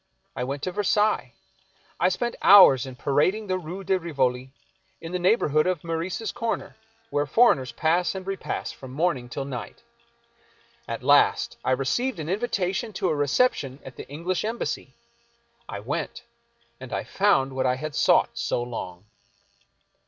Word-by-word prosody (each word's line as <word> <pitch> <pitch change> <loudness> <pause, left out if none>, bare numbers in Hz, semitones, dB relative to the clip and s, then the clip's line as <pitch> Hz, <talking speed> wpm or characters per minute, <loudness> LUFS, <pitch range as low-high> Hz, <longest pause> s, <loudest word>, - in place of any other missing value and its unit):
I - - -2
went 140 +2 -4
to 185 - -1
Versailles. 205 - +1 0.7
I 180 - +4
spent 240 +5 -2
hours 140 -10 +8
in 130 - -8
parading 155 - +1
the 185 -2 -1
Rue 180 +3 -7
de 190 0 +1
Rivoli, 130 -6 -1 0.5
in 165 - -8
the 180 - -2
neighborhood 165 -5 +2
of 180 -4 -1
Meurice's 170 +6 -3
corner, 230 -1 -3 0.4
where 145 0 0
foreigners 145 - +3
pass 170 +8 +1
and 190 -1 -6
repass 195 0 -4
from 130 - -11
morning 145 -5 -1
till 135 +3 -4
night. 130 -4 -7 1.0
At - - -5
last - - +3
I - - -1
received 155 - 0
an 155 0 -5
invitation 200 +1 -1
to 185 - -1
a 155 - +1
reception 145 - +1
at 130 - -10
the - - -10
English 170 +5 -2
Em 225 +2 -2
bassy. - - -4 0.8
I - - -5
went, - - -4 0.6
and - - -10
I - - -2
found 135 -10 +2
what 130 0 0
I 125 - +2
had 150 +3 -5
sought - - +3
so 120 - -1
long. 105 -6 -7
165 Hz, 160 wpm, -25 LUFS, 135-195 Hz, 1.0 s, hours